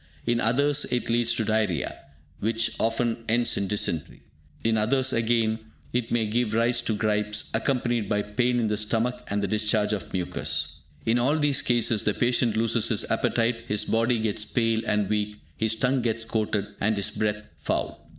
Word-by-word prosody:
In 120 0 +1
others, 140 +5 +2
it 125 -2 -1
leads 115 0 +2
to 110 - -1
diarrhea, 105 -8 0 0.4
which 115 +1 0
often 115 0 0
ends 120 +1 +2
in 100 - -1
dysentery. 95 -6 -2 0.4
In 115 0 +2
others 130 +5 +2
again, 115 -1 +1 0.3
it 120 -1 0
may 115 -2 +2
give 110 0 0
rise 120 +1 +3
to 115 -2 -1
gripes, 105 0 0
accompanied 120 -3 0
by 105 -1 +1
pain 120 +4 +1
in 115 - +1
the 105 0 0
stomach 115 +4 0
and 100 0 -1
the - - +1
discharge 105 +1 +1
of 105 - -4
mucus. 90 -2 -2 0.3
In 115 +2 +3
all 140 +6 +2
these 145 -3 +2
cases, 120 -3 +2
the 105 - 0
patient 120 -2 +2
loses 115 0 +2
his - - 0
appetite, 115 0 +1
his 105 -1 +1
body 115 +2 +2
gets 110 -1 0
pale 115 0 0
and 105 -1 +1
weak, 105 0 -1 0.2
his 110 0 +1
tongue 125 +3 +1
gets 115 -1 -1
coated, 105 -2 -1
and 105 +1 +1
his 100 - -1
breath 105 -1 -2
foul. - - -3
115 Hz, 180 wpm, -26 LUFS, 105-120 Hz, 0.4 s, rise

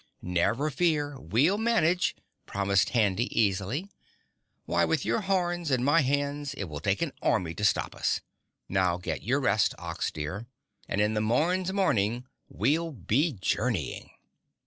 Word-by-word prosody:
"Never 110 - +1
fear, 145 -2 0
we'll 135 - +2
manage," 180 -7 +2 0.3
promised 100 -1 +1
Handy 110 -1 +2
easily. 105 - 0 0.8
"Why - - +1
with - - +1
your - - +1
horns 175 -4 0
and 130 -2 +1
my 150 +3 +5
hands 145 +1 -1
it 105 - -4
will 75 -5 -6
take - - 0
an - - -2
army 85 -3 +1
to 105 - -6
stop 105 - +2
us. - - 0 0.5
Now 90 -2 +1
get 90 - -4
your 130 +5 +1
rest, 110 -6 +2
Ox 85 -2 -3
dear, 90 +9 -5 0.4
and 105 - 0
in 105 +1 +2
the 105 - 0
morn's 170 +12 +1
morning 120 - +1 0.2
we'll 165 +3 0
be 135 - 0
journeying." 95 - -2
125 Hz, 145 wpm, -28 LUFS, 100-155 Hz, 0.8 s, my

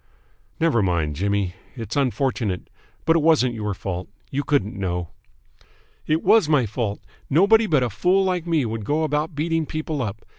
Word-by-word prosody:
"Never 160 -9 +3
mind, 85 -6 0
Jimmy. 100 +1 0 0.2
It's 115 -3 -6
unfortunate, 130 -8 -1 0.3
but 165 - +4
it 165 - +3
wasn't 150 -6 +3
your 105 -3 -3
fault. 90 -1 -5 0.2
You 140 +2 -1
couldn't 140 -9 0
know." 90 -4 -3 1.0
"It 155 +2 +1
was 220 -9 +5
my 145 -6 +3
fault. 105 -1 -3 0.3
Nobody 210 +9 +5
but 150 -8 +3
a 125 - 0
fool 190 +2 +2
like 180 -2 -1
me 160 -6 +2
would 110 -1 -4
go 150 +9 0
about 150 +1 -1
beating 165 +1 0
people 155 -2 -3
up. 110 -2 -5
135 Hz, 170 wpm, -23 LUFS, 100-160 Hz, 1.0 s, was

